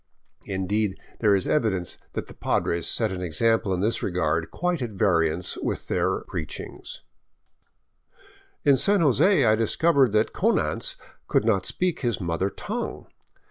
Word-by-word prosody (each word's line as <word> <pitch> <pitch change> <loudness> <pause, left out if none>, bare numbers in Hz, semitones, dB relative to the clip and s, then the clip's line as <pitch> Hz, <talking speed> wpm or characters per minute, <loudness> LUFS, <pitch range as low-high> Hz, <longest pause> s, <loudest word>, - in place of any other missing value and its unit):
Indeed, 100 +1 -1 0.2
there 105 -3 +4
is 95 - 0
evidence 100 - 0
that - - -4
the - - -12
Padres 85 -1 0
set 110 -3 +2
an 90 -1 -5
example 105 +5 +1
in 90 -1 0
this 110 +3 +1
regard 85 -3 -1
quite 180 -3 -2
at 120 - -2
variance 90 -4 +1
with - - -3
their - - 0
preaching. 80 -4 -7 1.8
In 140 -2 +5
San 200 +6 +3
Jose 150 - +4
I 110 - +5
discovered 135 +3 +3
that 110 0 +2
Konanz - - +1 0.3
could - - +1
not 100 -5 +1
speak 180 -2 -1
his 120 -5 -1
mother 85 +2 -1
tongue. - - -5
105 Hz, 140 wpm, -25 LUFS, 90-120 Hz, 1.8 s, In